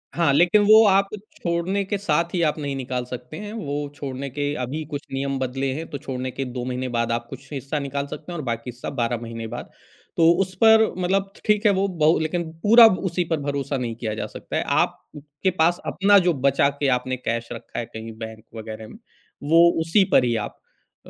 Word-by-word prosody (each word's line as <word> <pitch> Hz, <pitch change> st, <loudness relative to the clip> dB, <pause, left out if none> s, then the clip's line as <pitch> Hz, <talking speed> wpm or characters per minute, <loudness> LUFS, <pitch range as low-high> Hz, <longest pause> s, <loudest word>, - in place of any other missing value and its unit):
हाँ, 170 Hz, -4 st, +3 dB
लेकिन 175 Hz, +8 st, +5 dB
वो 215 Hz, +2 st, +8 dB
आप 195 Hz, 0 st, +4 dB, 0.3 s
छोड़ने 175 Hz, +3 st, -1 dB
के 205 Hz, -, -2 dB
साथ 170 Hz, -3 st, 0 dB
ही 175 Hz, -, 0 dB
आप -, -, -5 dB
नहीं 140 Hz, -2 st, -3 dB
निकाल 125 Hz, -2 st, -3 dB
सकते 125 Hz, +4 st, -8 dB
हैं। 210 Hz, 0 st, -7 dB
वो 145 Hz, -9 st, -3 dB
छोड़ने 140 Hz, -1 st, -5 dB
के 145 Hz, +2 st, -2 dB
अभी 145 Hz, +6 st, -3 dB
कुछ 145 Hz, -1 st, -3 dB
नियम 135 Hz, 0 st, -2 dB
बदले 130 Hz, +1 st, -2 dB
हैं 160 Hz, +3 st, -5 dB
तो 140 Hz, -, -5 dB
छोड़ने 130 Hz, -3 st, -5 dB
के 135 Hz, +2 st, -4 dB
2 125 Hz, -1 st, -5 dB
महीने 130 Hz, 0 st, -3 dB
बाद 115 Hz, -1 st, -1 dB
आप 120 Hz, 0 st, -1 dB
कुछ 135 Hz, +1 st, -11 dB
हिस्सा 140 Hz, +2 st, -3 dB
निकाल 140 Hz, 0 st, -3 dB
सकते 155 Hz, +4 st, -8 dB
हैं 175 Hz, -, -5 dB
और 155 Hz, -, -5 dB
बाकी 115 Hz, +1 st, -3 dB
सब 120 Hz, +3 st, -7 dB
12 120 Hz, -1 st, 0 dB
महीने 115 Hz, -1 st, -6 dB
बाद। 120 Hz, +2 st, -7 dB, 0.5 s
तो 165 Hz, 0 st, +6 dB
उस 185 Hz, -1 st, -3 dB
पर 220 Hz, 0 st, +7 dB
मतलब 195 Hz, +2 st, 0 dB
ठ -, -, -18 dB
ठीक 210 Hz, +1 st, +2 dB
है 210 Hz, -, +6 dB
वो 195 Hz, 0 st, +1 dB
बहु 160 Hz, -3 st, +2 dB
लेकिन 160 Hz, +2 st, -1 dB, 0.2 s
पूरा 230 Hz, +2 st, +9 dB
ब 185 Hz, -, 0 dB
उसी 180 Hz, -1 st, 0 dB
पर 160 Hz, -, +1 dB
भरोसा 140 Hz, -1 st, -2 dB
नहीं 120 Hz, -3 st, -3 dB
किया 110 Hz, -2 st, -4 dB
जा -, -, -3 dB
सकता -, -, -8 dB
है। -, -, 0 dB, 0.2 s
आपके 150 Hz, +4 st, -3 dB
पास 170 Hz, +2 st, +3 dB
अपना 200 Hz, +2 st, +4 dB
जो 180 Hz, -2 st, +2 dB
बचा 140 Hz, +1 st, +3 dB
के 140 Hz, -, +1 dB
आपने 130 Hz, +1 st, -4 dB
कैश 115 Hz, -1 st, -3 dB
रखा 115 Hz, -, -6 dB
है 120 Hz, -, -3 dB
कहीं 110 Hz, +1 st, -8 dB
बैंक 110 Hz, -1 st, -8 dB
वग़ैरह 110 Hz, 0 st, -7 dB
में, -, -, -12 dB, 0.5 s
वो 165 Hz, +3 st, +6 dB
उसी 165 Hz, +5 st, +3 dB
पर 125 Hz, -, +5 dB
ही 120 Hz, -1 st, +1 dB
आप 105 Hz, -2 st, -4 dB, 0.5 s
अ -, -, -12 dB
140 Hz, 225 wpm, -23 LUFS, 125-175 Hz, 0.5 s, पूरा